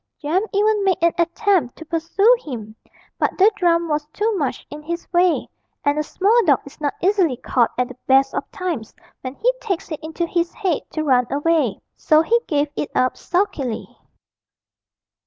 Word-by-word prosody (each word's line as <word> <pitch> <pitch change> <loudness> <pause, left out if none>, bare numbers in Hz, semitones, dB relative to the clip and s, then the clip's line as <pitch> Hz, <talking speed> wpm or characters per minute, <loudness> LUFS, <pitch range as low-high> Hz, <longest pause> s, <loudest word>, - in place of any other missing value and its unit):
Jem 325 +5 0
even 420 0 +2
made 380 -2 +2
an 335 - +4
attempt 340 - +1
to 320 - -11
pursue 335 +9 +3
him, 220 -7 -7 0.4
but - - 0
the 395 +3 +6
drum 340 -3 +2
was 300 -1 -1
too 420 +8 -1
much 285 -8 -2
in 295 +1 -8
his 340 +3 -5
way, 350 0 +3 0.4
and 285 +1 +2
a - - +2
small 390 +8 +1
dog 285 -6 +4
is 280 +2 -14
not 290 -2 -1
easily 365 -8 +2
caught 240 -1 +1
at 250 0 +1
the 255 - -12
best 270 0 +4
of - - -4
times 335 - -4 0.3
when 255 +1 -6
he - - +1
takes 385 -8 -3
it 310 - -4
into 320 +2 -3
his 340 0 -1
head 375 -8 0
to 310 - -3
run 250 -4 +3
away. 290 -6 +1 0.2
So 310 +1 +4
he 470 +7 +3
gave 290 -1 +1
it 295 - -3
up 255 0 +2
sulkily. 300 - -2
325 Hz, 180 wpm, -21 LUFS, 280-370 Hz, 0.4 s, the